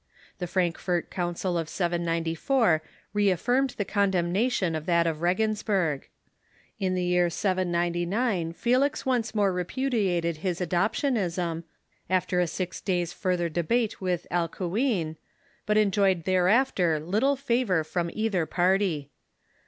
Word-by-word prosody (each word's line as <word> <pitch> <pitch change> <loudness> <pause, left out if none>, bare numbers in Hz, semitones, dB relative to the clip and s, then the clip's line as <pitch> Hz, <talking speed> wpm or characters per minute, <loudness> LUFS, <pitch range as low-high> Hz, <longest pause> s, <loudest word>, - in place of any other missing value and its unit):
The 180 - -3
Frankfort 175 -1 -1
Council 175 0 -1
of 160 -1 -4
794 170 - +1 0.3
reaftirmed 215 +7 +1
the 205 - -2
condemnation 190 +1 +1
of 155 +1 -4
that 170 -1 +3
of 160 -1 -2
Regensburg. 190 -4 0 0.7
In 185 -1 0
the 180 - 0
year 180 0 +2
799 175 +1 0
Felix 255 +10 +1
once 240 -4 0
more 200 -3 +2
repudiated 180 -4 0
his 175 +1 -2
adoptianism, 180 - 0 0.4
after 185 -1 +1
a 175 - +2
six 180 +2 -4
days' 175 -2 -1
further 180 -3 0
debate 200 +9 0
with 180 -2 -1
Alcuin, 175 - -1 0.5
but 210 0 +3
enjoyed 195 -4 +3
thereafter 185 - +2
little 215 - +1
favor 235 - +1
from 170 +2 -2
either 210 -7 0
party. 180 -5 +1
180 Hz, 115 wpm, -27 LUFS, 170-210 Hz, 0.7 s, that